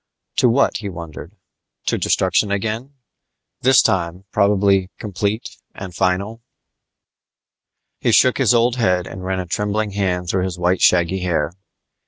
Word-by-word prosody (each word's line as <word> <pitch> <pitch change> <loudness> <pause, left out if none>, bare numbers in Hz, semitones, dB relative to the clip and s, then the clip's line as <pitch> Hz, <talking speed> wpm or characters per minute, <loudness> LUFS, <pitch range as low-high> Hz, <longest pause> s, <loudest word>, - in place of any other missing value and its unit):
To 125 - +4
what, 135 +4 +2
he 105 -2 -5
wondered? 85 -4 -9 0.5
To - - 0
destruction 95 +3 +1
again 110 +7 -3 0.7
this 130 0 +5
time, 85 0 -1
probably 100 -2 +2
complete 105 +2 -3 0.2
and 95 -2 -8
final? 95 +6 -1 1.6
He - - +1
shook 130 +1 +4
his 125 -3 +4
old 120 +1 +2
head 90 -7 +1
and 95 - -8
ran 95 0 -2
a 90 - -3
trembling 105 +4 -2
hand 90 -3 -1
through 90 +1 0
his 90 -2 -4
white 90 +1 0
shaggy 90 +1 +3
hair. 85 -4 -1
95 Hz, 140 wpm, -20 LUFS, 90-110 Hz, 1.6 s, this